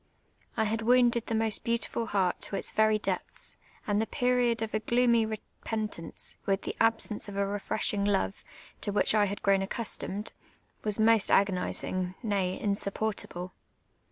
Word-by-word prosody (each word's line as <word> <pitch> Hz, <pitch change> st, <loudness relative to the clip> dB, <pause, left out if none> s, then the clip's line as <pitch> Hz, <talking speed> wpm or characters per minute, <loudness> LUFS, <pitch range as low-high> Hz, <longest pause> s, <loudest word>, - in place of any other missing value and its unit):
I 220 Hz, -, +2 dB
liad 220 Hz, +2 st, -1 dB
wounded 240 Hz, 0 st, +3 dB
the 225 Hz, -, -1 dB
most 220 Hz, -1 st, +3 dB
beautiful 230 Hz, 0 st, -1 dB
heart 190 Hz, -4 st, 0 dB
to -, -, -4 dB
its -, -, -1 dB
very 215 Hz, 0 st, +3 dB
depths; 215 Hz, -, -3 dB, 0.3 s
and 205 Hz, 0 st, +1 dB
the 220 Hz, -, -1 dB
period 245 Hz, -2 st, +1 dB
of 220 Hz, -, -5 dB
a 215 Hz, -, +1 dB
gloomy 235 Hz, 0 st, +3 dB
repentance, 215 Hz, -3 st, -5 dB
with 195 Hz, 0 st, +1 dB
the -, -, -4 dB
absence 225 Hz, -2 st, +1 dB
of 200 Hz, -, -7 dB
a 200 Hz, -, +2 dB
refreshing 205 Hz, 0 st, -1 dB
love, 195 Hz, -, 0 dB, 0.4 s
to 205 Hz, -, -1 dB
which 205 Hz, -, +3 dB
1 210 Hz, -1 st, +4 dB
had 200 Hz, +2 st, -5 dB
grown 195 Hz, -1 st, +4 dB
accustomed, 205 Hz, 0 st, -2 dB, 0.5 s
was 210 Hz, 0 st, 0 dB
most 220 Hz, -1 st, +4 dB
agonising, 185 Hz, -1 st, +1 dB
ruiy, 195 Hz, -3 st, 0 dB
insupportable. 200 Hz, -3 st, -2 dB
215 Hz, 155 wpm, -29 LUFS, 200-225 Hz, 0.5 s, 1